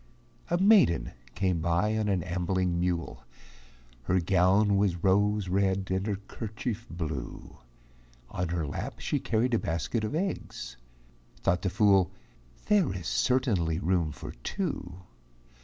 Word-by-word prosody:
A 175 - +2
maiden 185 - +4 0.2
came 90 -3 0
by 85 +6 +1
on 110 -1 0
an 95 -4 +1
ambling 90 0 -1
mule, 90 -1 -2 0.8
Her 95 0 +2
gown 95 +4 +3
was 100 -3 +2
rose 105 +1 +2
red 95 0 0
and 95 +2 0
her 105 - 0
kerchief 110 +3 -6
blue, 80 -7 -6 0.7
On 90 -2 -2
her 85 -2 -1
lap 70 - -5
she - - -1
carried 120 +2 0
a 115 - +3
basket 85 +7 -2
of 110 +8 -2
eggs. 160 - -3 0.7
Thought 90 -2 +1
the 95 - 0
fool, 95 -1 +4 0.6
"There 200 - +3
is 90 -3 -6
certainly 105 - +1
room 90 -4 +1
for - - -8
two." 95 - -4
95 Hz, 135 wpm, -29 LUFS, 85-105 Hz, 0.8 s, maiden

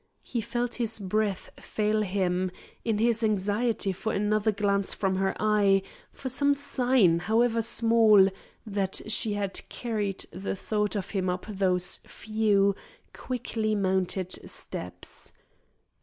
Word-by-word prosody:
He 235 - -3
felt 240 +2 -2
his 225 -1 +1
breath 205 -1 -2
fail 215 0 0
him, 185 -2 0 0.3
in 225 -3 0
his 230 +1 +2
anxiety 210 +1 +1
for 205 +4 -3
another 210 +1 +1
glance 200 -1 0
from 190 -2 0
her 190 0 0
eye, 205 -2 +3 0.3
for 270 - -7
some 285 +3 +2
sign, 250 -10 +2
however 225 +5 +2
small, 225 -3 +5 0.4
that 195 -3 -1
she 215 0 0
had 200 -2 -2
carried 210 -5 -3
the 190 +3 -4
thought 210 +2 -1
of 200 -1 -3
him 185 -3 -1
up 180 0 -3
those 185 -3 +2
few, 210 -2 +1 0.4
quickly 220 -3 -2
mounted 190 -1 -1
steps. - - -6
210 Hz, 125 wpm, -27 LUFS, 195-225 Hz, 0.4 s, small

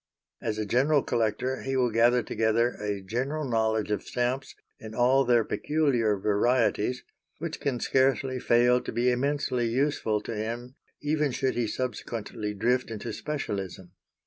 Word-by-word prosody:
As 110 - -2
a 110 - -1
general 135 +7 +3
collector 115 +3 -1
he 135 0 -2
will 125 -2 +2
gather 120 +2 +4
together 115 +2 +1
a 105 -1 -2
general 135 +9 -2
knowledge 110 -2 0
of 105 - 0
stamps 125 +2 -2 0.2
in 110 0 -9
all 130 +3 +4
their 120 -2 +4
peculiar 125 -6 +1
varieties, 115 +3 +1 0.3
which 165 0 -5
can 130 -4 -1
scarcely 130 0 +1
fail 120 +1 +4
to - - -5
be 125 +1 +2
immensely 130 -2 0
useful 125 -4 +1
to 115 - -5
him 120 +4 -4 0.3
even 150 -1 +1
should 130 +1 0
he 120 -2 0
subsequently 110 -3 -4
drift 125 +5 +1
into 110 0 -5
specialism. 100 - -4
120 Hz, 145 wpm, -27 LUFS, 110-130 Hz, 0.3 s, gather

